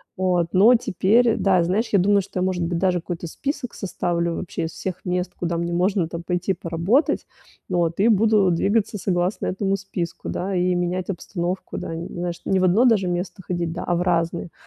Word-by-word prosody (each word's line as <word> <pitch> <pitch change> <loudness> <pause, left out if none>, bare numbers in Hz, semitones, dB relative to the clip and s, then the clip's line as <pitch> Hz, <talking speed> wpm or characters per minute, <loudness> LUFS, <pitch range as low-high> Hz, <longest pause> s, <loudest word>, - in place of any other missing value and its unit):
Вот, 180 -2 +1
но 215 +7 +7
теперь, 225 +2 +2
да, 190 -3 +3
знаешь, 200 +7 0
я 200 - +4
думаю, 200 +2 +4
что 185 - -6
я, - - +1
может 185 -2 0
быть, 170 0 -1
даже 180 0 +1
какой-то 175 0 -5
список 275 - -4
составлю 170 -3 -2
вообще 170 -2 -4
из 160 - -5
всех 185 -2 -5
мест, 180 0 -1
куда 170 -1 -2
мне 170 0 -2
можно 180 0 +1
там 170 +1 -6
пойти 180 +2 -1
поработать, 175 - 0 0.4
вот, 170 -2 0
и 205 - +4
буду 210 -3 +4
двигаться 210 +5 +1
согласно 180 +1 -1
этому 195 +1 0
списку, 190 -4 -5
да, 190 +1 -2
и 180 0 +2
менять 175 +1 -2
обстановку, 180 0 -4
да, - - -6
знаешь, 175 +1 -5
не 190 - +2
в - - +1
одно 190 +7 +4
даже 215 -6 +3
место 180 +2 -3
ходить, 175 -2 -2
да, 175 - -5
а 175 - +1
в 175 - 0
разные. 170 -1 0
180 Hz, 195 wpm, -23 LUFS, 175-195 Hz, 0.4 s, но